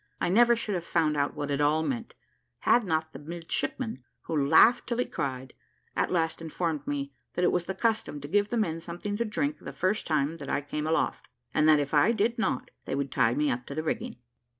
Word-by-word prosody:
I -, -, 0 dB
never 235 Hz, +5 st, +6 dB
should 220 Hz, -2 st, -3 dB
have 175 Hz, -3 st, -2 dB
found 160 Hz, -3 st, +1 dB
out 145 Hz, 0 st, 0 dB
what 145 Hz, -1 st, -3 dB
it 140 Hz, +1 st, 0 dB
all 150 Hz, +2 st, +3 dB
meant, 235 Hz, +4 st, -3 dB, 0.5 s
had 240 Hz, -, +4 dB
not 160 Hz, -4 st, -1 dB
the -, -, -8 dB
midshipman, 170 Hz, -, -4 dB, 0.2 s
who 160 Hz, -, -3 dB
laughed 190 Hz, +11 st, +6 dB
till 235 Hz, -, -1 dB
he 250 Hz, -, +1 dB
cried, 130 Hz, -1 st, -4 dB, 0.4 s
at -, -, 0 dB
last 165 Hz, -2 st, 0 dB
informed 160 Hz, -2 st, -3 dB
me 140 Hz, -1 st, -3 dB, 0.2 s
that 180 Hz, -, +2 dB
it -, -, +4 dB
was 180 Hz, -1 st, 0 dB
the 190 Hz, -, -4 dB
custom 220 Hz, -10 st, 0 dB
to 145 Hz, -, -6 dB
give 205 Hz, +5 st, +2 dB
the 240 Hz, -, -1 dB
men 165 Hz, -7 st, 0 dB
something 175 Hz, +5 st, -5 dB
to 235 Hz, -, 0 dB
drink 150 Hz, -9 st, -1 dB
the -, -, -7 dB
first 185 Hz, +4 st, -1 dB
time 155 Hz, 0 st, +1 dB
that 140 Hz, -3 st, -8 dB
I 145 Hz, -, 0 dB
came 150 Hz, +2 st, -4 dB
aloft, 160 Hz, -, 0 dB, 0.3 s
and 155 Hz, +1 st, +4 dB
that 155 Hz, -1 st, +6 dB
if 145 Hz, 0 st, -2 dB
I 150 Hz, +10 st, +5 dB
did 230 Hz, +2 st, 0 dB
not, 175 Hz, -, -1 dB
they -, -, -2 dB
would 140 Hz, -1 st, -2 dB
tie 120 Hz, -2 st, +2 dB
me 150 Hz, 0 st, +2 dB
up 125 Hz, +1 st, -4 dB
to 140 Hz, -, -6 dB
the 155 Hz, -, -2 dB
rigging. 160 Hz, -, -3 dB
160 Hz, 230 wpm, -28 LUFS, 145-205 Hz, 0.5 s, never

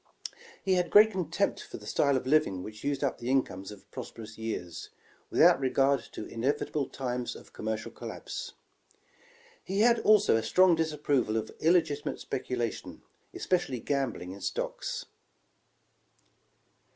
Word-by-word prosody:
''He 190 Hz, -1 st, +3 dB
had 175 Hz, -1 st, +1 dB
great 215 Hz, +3 st, +7 dB
contempt 185 Hz, -4 st, -1 dB
for -, -, -9 dB
the -, -, -13 dB
style 140 Hz, -2 st, +2 dB
of 130 Hz, -, -4 dB
living 130 Hz, -10 st, +2 dB
which 105 Hz, 0 st, -9 dB
used 140 Hz, 0 st, -1 dB
up 140 Hz, -, -1 dB
the 120 Hz, -, -4 dB
incomes 100 Hz, -8 st, 0 dB
of 105 Hz, -, -13 dB
prosperous 110 Hz, -1 st, -8 dB
years, 110 Hz, -7 st, -5 dB, 0.4 s
without -, -, +6 dB
regard 135 Hz, +1 st, +3 dB
to -, -, -6 dB
inevitable 135 Hz, +3 st, -1 dB
times 125 Hz, -2 st, -3 dB
of -, -, -14 dB
commercial 110 Hz, 0 st, -4 dB
collapse. -, -, -7 dB, 1.1 s
He 195 Hz, +2 st, -1 dB
had 235 Hz, 0 st, +5 dB
also 210 Hz, -, +5 dB
a 115 Hz, -, +2 dB
strong 180 Hz, +11 st, +5 dB
disapproval 150 Hz, -8 st, 0 dB
of 110 Hz, -, -3 dB
illegitimate 160 Hz, -3 st, +2 dB
speculation, 125 Hz, -3 st, -4 dB, 0.3 s
especially 170 Hz, -9 st, 0 dB
gambling 125 Hz, -9 st, -2 dB
in 100 Hz, +1 st, -9 dB
stocks. -, -, -3 dB
135 Hz, 135 wpm, -29 LUFS, 115-160 Hz, 1.1 s, great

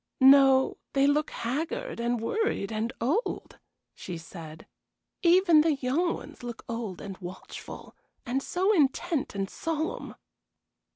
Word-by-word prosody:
"No, 270 Hz, 0 st, +6 dB, 0.2 s
they 275 Hz, 0 st, +4 dB
look 295 Hz, +2 st, +2 dB
haggard, 265 Hz, +2 st, -3 dB
and 235 Hz, 0 st, 0 dB
worried, 230 Hz, -, -1 dB
and 220 Hz, +2 st, -2 dB
old," 310 Hz, -, -2 dB, 0.3 s
she 180 Hz, -2 st, -7 dB
said. 165 Hz, -1 st, -10 dB, 0.6 s
"Even 345 Hz, -2 st, +6 dB
the 310 Hz, -1 st, +2 dB
young 280 Hz, +7 st, 0 dB
ones -, -, -11 dB
look 240 Hz, -2 st, -7 dB
old 230 Hz, -6 st, -4 dB
and 195 Hz, -2 st, -7 dB
watchful, 185 Hz, 0 st, -9 dB, 0.3 s
and 255 Hz, +3 st, -1 dB
so 375 Hz, +8 st, +1 dB
intent 305 Hz, -, +1 dB
and 195 Hz, -1 st, -1 dB
solemn." 320 Hz, -, -3 dB
265 Hz, 125 wpm, -28 LUFS, 225-320 Hz, 0.6 s, No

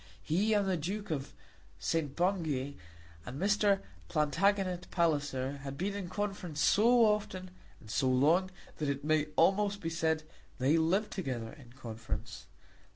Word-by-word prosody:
He 195 Hz, -, +2 dB
and 200 Hz, -1 st, +2 dB
the 185 Hz, -2 st, +1 dB
Duke 195 Hz, +5 st, -4 dB
of 140 Hz, -3 st, -4 dB, 0.4 s
St. 155 Hz, -4 st, -1 dB
Bungay, 160 Hz, -7 st, 0 dB, 0.5 s
and 130 Hz, -, -7 dB
Mr. 200 Hz, 0 st, +3 dB, 0.3 s
Plantagenet 180 Hz, +4 st, +1 dB
Palliser, 145 Hz, -5 st, 0 dB
had 140 Hz, 0 st, -7 dB
been 195 Hz, +6 st, -1 dB
in 200 Hz, -3 st, -5 dB
conference 195 Hz, -5 st, -3 dB
so 230 Hz, -, +5 dB
often, 195 Hz, -3 st, -1 dB, 0.3 s
and -, -, -16 dB
so 130 Hz, +2 st, +2 dB
long, 155 Hz, +9 st, +3 dB, 0.3 s
that 150 Hz, -2 st, -1 dB
it 140 Hz, 0 st, -2 dB
may 155 Hz, -1 st, +2 dB
almost 200 Hz, +3 st, +3 dB
be 165 Hz, -4 st, -3 dB
said 160 Hz, -1 st, 0 dB, 0.3 s
they 135 Hz, +5 st, +3 dB
lived 175 Hz, +6 st, +2 dB
together 125 Hz, -, -4 dB
in 125 Hz, -5 st, -15 dB
conference. 115 Hz, -4 st, -6 dB
165 Hz, 145 wpm, -32 LUFS, 140-195 Hz, 0.5 s, so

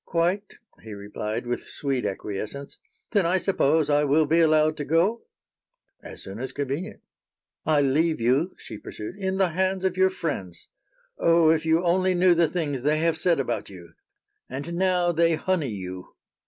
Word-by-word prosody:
"Quite," 175 Hz, +5 st, -1 dB, 0.3 s
he 110 Hz, -2 st, -9 dB
replied, 105 Hz, +3 st, -5 dB
with 120 Hz, 0 st, -3 dB
sweet 135 Hz, -6 st, -1 dB
acquiescence. 105 Hz, +7 st, -6 dB, 0.3 s
"Then 200 Hz, -6 st, +2 dB
I 180 Hz, +2 st, +2 dB
suppose 160 Hz, -5 st, +2 dB
I 145 Hz, 0 st, +3 dB
will 150 Hz, +2 st, +3 dB
be 160 Hz, +3 st, +2 dB
allowed 155 Hz, -1 st, +4 dB
to 145 Hz, -, -3 dB
go?" 175 Hz, -, +1 dB, 0.7 s
"As -, -, -9 dB
soon 95 Hz, +3 st, -8 dB
as 130 Hz, +1 st, -5 dB
convenient." 145 Hz, +9 st, -4 dB, 0.7 s
"I 155 Hz, -2 st, +4 dB
leave 155 Hz, +3 st, +1 dB
you," 135 Hz, +10 st, +1 dB
she 105 Hz, -, -9 dB
pursued, 105 Hz, -, -8 dB
"in 190 Hz, -1 st, -2 dB
the 190 Hz, -2 st, +2 dB
hands 190 Hz, +2 st, -1 dB
of 185 Hz, -1 st, 0 dB
your 190 Hz, 0 st, +4 dB
friends. 145 Hz, -, -5 dB, 0.5 s
Oh! 165 Hz, -1 st, +5 dB
if 160 Hz, 0 st, 0 dB
you 160 Hz, +2 st, +3 dB
only 185 Hz, +1 st, +2 dB
knew 180 Hz, 0 st, +5 dB
the 170 Hz, -1 st, +3 dB
things 145 Hz, -7 st, -2 dB
they 150 Hz, +3 st, +2 dB
have 165 Hz, +1 st, +1 dB
said 170 Hz, -5 st, +1 dB
about 135 Hz, -, -2 dB
you! 85 Hz, -4 st, -13 dB, 0.6 s
And 140 Hz, +6 st, -5 dB
now 180 Hz, -1 st, +2 dB
they 165 Hz, 0 st, +2 dB
honey 160 Hz, -3 st, -1 dB
you!" 95 Hz, -3 st, -7 dB
160 Hz, 170 wpm, -25 LUFS, 130-180 Hz, 0.7 s, Oh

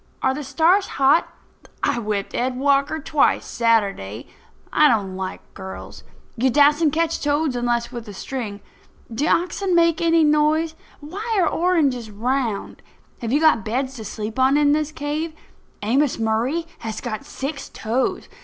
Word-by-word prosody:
Are 265 Hz, -, +3 dB
the 295 Hz, +2 st, -5 dB
stars 330 Hz, +9 st, +3 dB
hot? 275 Hz, +4 st, +4 dB, 0.5 s
I -, -, +1 dB
whipped 210 Hz, -3 st, -3 dB
Ed 250 Hz, +1 st, -1 dB
Walker 280 Hz, +3 st, +2 dB
twice, 305 Hz, -1 st, +1 dB
Saturday. 200 Hz, -, 0 dB, 0.5 s
I 305 Hz, -, +6 dB
don't 200 Hz, -7 st, +1 dB
like 190 Hz, 0 st, -6 dB
girls. 190 Hz, 0 st, -9 dB, 0.3 s
You 260 Hz, +2 st, +2 dB
dassent 295 Hz, +3 st, +4 dB
catch 330 Hz, +1 st, 0 dB
toads 290 Hz, -2 st, 0 dB
unless 240 Hz, 0 st, -1 dB
with 240 Hz, -3 st, -7 dB
a 205 Hz, -, -8 dB
string. 215 Hz, -4 st, -5 dB, 0.5 s
Do 280 Hz, +8 st, 0 dB
oxen 360 Hz, +2 st, +1 dB
make 335 Hz, -1 st, +3 dB
any 330 Hz, -1 st, +4 dB
noise? 305 Hz, +2 st, +2 dB, 0.3 s
Why 410 Hz, +9 st, -3 dB
are 350 Hz, -, +3 dB
oranges 290 Hz, -10 st, +1 dB
round? 230 Hz, 0 st, -2 dB, 0.4 s
Have 230 Hz, -2 st, -4 dB
you 285 Hz, -, +3 dB
got 310 Hz, -9 st, +4 dB
beds 260 Hz, +5 st, -2 dB
to 220 Hz, -, -7 dB
sleep 215 Hz, +3 st, -5 dB
on 265 Hz, +2 st, +4 dB
in 295 Hz, -1 st, +4 dB
this 305 Hz, 0 st, 0 dB
cave? 310 Hz, +1 st, -3 dB, 0.5 s
Amos 265 Hz, +6 st, +2 dB
Murray 230 Hz, +9 st, 0 dB
has 220 Hz, -1 st, -5 dB
got 215 Hz, -3 st, -5 dB
six 275 Hz, +2 st, -6 dB
toes. 235 Hz, +4 st, -2 dB
270 Hz, 155 wpm, -22 LUFS, 230-310 Hz, 0.5 s, I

